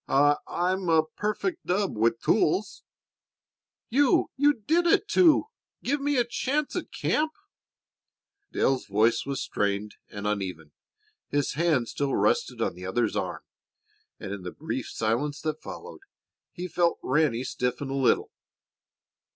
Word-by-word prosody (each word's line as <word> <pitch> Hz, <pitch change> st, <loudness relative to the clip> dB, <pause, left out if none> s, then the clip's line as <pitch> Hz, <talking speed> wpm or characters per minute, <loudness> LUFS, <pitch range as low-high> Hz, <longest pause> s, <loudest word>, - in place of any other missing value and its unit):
I 145 Hz, +2 st, +4 dB
I'm 180 Hz, +1 st, -1 dB
a 160 Hz, -1 st, +5 dB
perfect 215 Hz, -, -3 dB
dub 190 Hz, -, 0 dB
with 115 Hz, +2 st, +1 dB
tools." 190 Hz, +6 st, +1 dB, 1.1 s
"You 275 Hz, +1 st, +3 dB
you 290 Hz, +2 st, +4 dB
did 325 Hz, +11 st, +1 dB
it -, -, +3 dB
to 340 Hz, -4 st, +5 dB, 0.4 s
give 280 Hz, +3 st, 0 dB
me 290 Hz, 0 st, +1 dB
a 240 Hz, -, +3 dB
chance 280 Hz, +5 st, -1 dB
at -, -, -4 dB
camp." 310 Hz, +1 st, 0 dB, 1.2 s
Dale's 135 Hz, -1 st, +1 dB
voice 110 Hz, +5 st, +2 dB
was 140 Hz, -1 st, -2 dB
strained 100 Hz, +1 st, -2 dB
and 100 Hz, 0 st, -7 dB
uneven. 95 Hz, -7 st, -3 dB, 0.6 s
His 145 Hz, -1 st, 0 dB
hand 150 Hz, -6 st, +1 dB
still 140 Hz, +2 st, -1 dB
rested -, -, +1 dB
on -, -, -1 dB
the 90 Hz, +1 st, -11 dB
other's 110 Hz, +3 st, 0 dB
arm, -, -, -3 dB, 0.8 s
and -, -, -6 dB
in 100 Hz, -1 st, -5 dB
the 90 Hz, -, -5 dB
brief 130 Hz, -, -5 dB
silence 125 Hz, +7 st, -1 dB
that 155 Hz, -1 st, -3 dB
followed 470 Hz, -1 st, -9 dB, 0.5 s
he 180 Hz, 0 st, -5 dB
felt 170 Hz, 0 st, +1 dB
Ranny 130 Hz, -3 st, +2 dB
stiffen 125 Hz, +1 st, -2 dB
a -, -, -2 dB
little. 135 Hz, -2 st, +2 dB
145 Hz, 140 wpm, -27 LUFS, -, 1.2 s, a